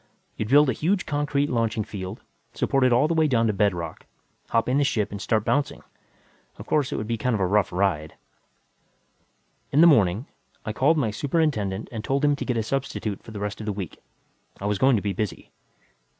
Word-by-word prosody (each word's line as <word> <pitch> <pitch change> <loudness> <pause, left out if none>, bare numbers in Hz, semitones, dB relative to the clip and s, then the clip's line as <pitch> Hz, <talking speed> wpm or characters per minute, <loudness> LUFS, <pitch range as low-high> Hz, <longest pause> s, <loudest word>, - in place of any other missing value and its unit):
You'd 105 - -4
build 145 +2 +6
a 130 - +1
huge 180 - 0
concrete 145 -1 0
launching 115 -4 0
field, 95 0 -7 0.3
supported 130 -2 +2
all 125 +5 +4
the 170 - 0
way 160 -1 +3
down 115 -5 +2
to 110 - +1
bedrock, 90 -6 -1 0.4
hop 115 -1 +1
in 130 +3 +2
the - - +3
ship 110 -7 0
and 100 -1 -6
start 110 +4 0
bouncing. 145 0 0 0.7
Of - - -9
course 145 -4 +1
it - - -2
would 110 - -3
be 115 0 -2
kind 125 0 +1
of - - -2
a 95 - +2
rough 100 +1 +2
ride.... 90 -5 -1 1.6
In 145 - +2
the 170 - +8
morning, 110 - +4 0.4
I 110 - -3
called 150 +8 +3
my 120 -8 +1
superintendent 110 - -1
and 110 -3 -5
told 140 +2 0
him 145 0 +3
to - - -4
get 125 -3 -1
a 110 - 0
substitute 115 -5 -3
for - - -13
the 105 -2 -7
rest 105 0 -4
of 110 - -7
the - - +1
week; 95 -5 -7 0.6
I 100 - -5
was 105 -1 0
going 135 -1 +5
to 100 - -1
be 100 -2 -1
busy. 105 +1 -4
115 Hz, 210 wpm, -25 LUFS, 100-140 Hz, 1.6 s, the